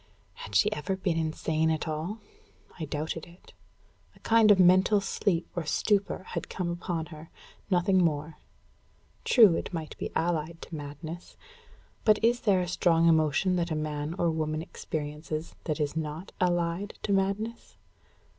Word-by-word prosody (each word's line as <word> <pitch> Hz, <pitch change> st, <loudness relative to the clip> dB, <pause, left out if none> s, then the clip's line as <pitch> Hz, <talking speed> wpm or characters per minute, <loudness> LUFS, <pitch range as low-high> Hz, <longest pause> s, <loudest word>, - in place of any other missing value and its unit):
Had 100 Hz, -, -9 dB
she 90 Hz, -, +4 dB
ever 150 Hz, +6 st, -2 dB
been 185 Hz, -3 st, -1 dB
insane 160 Hz, 0 st, 0 dB
at 160 Hz, 0 st, -1 dB
all? 160 Hz, +7 st, -3 dB, 0.6 s
I 160 Hz, -, -2 dB
doubted 155 Hz, +2 st, -4 dB
it. 175 Hz, +2 st, -18 dB, 0.6 s
A -, -, -20 dB
kind 225 Hz, -1 st, +4 dB
of 205 Hz, -, +7 dB
mental 185 Hz, +3 st, +5 dB
sleep 195 Hz, -3 st, -1 dB
or 175 Hz, -, -1 dB
stupor 200 Hz, +6 st, 0 dB
had -, -, -4 dB
come 175 Hz, -2 st, -2 dB
upon 170 Hz, -1 st, -3 dB
her 155 Hz, +2 st, -11 dB, 0.4 s
nothing 185 Hz, 0 st, +3 dB
more. 155 Hz, -1 st, -1 dB, 0.9 s
True 220 Hz, -8 st, +7 dB
it -, -, -3 dB
might 160 Hz, -3 st, -5 dB
be -, -, -3 dB
allied 165 Hz, -1 st, -1 dB
to -, -, -12 dB
madness; 155 Hz, +4 st, -8 dB, 0.7 s
but 215 Hz, -1 st, +5 dB
is 240 Hz, +1 st, +4 dB
there 195 Hz, -6 st, +3 dB
a 180 Hz, -, -2 dB
strong 170 Hz, -1 st, +3 dB
emotion 160 Hz, +3 st, +3 dB
that 170 Hz, 0 st, -1 dB
man 155 Hz, +1 st, -3 dB
or 170 Hz, -3 st, +2 dB
woman 155 Hz, 0 st, -2 dB
experiences 155 Hz, 0 st, -5 dB
that 155 Hz, 0 st, -2 dB
is 150 Hz, 0 st, -1 dB
not 160 Hz, +3 st, -4 dB
allied 175 Hz, +2 st, 0 dB
to 200 Hz, -, 0 dB
madness? 200 Hz, +4 st, -2 dB
170 Hz, 155 wpm, -28 LUFS, 155-185 Hz, 0.9 s, of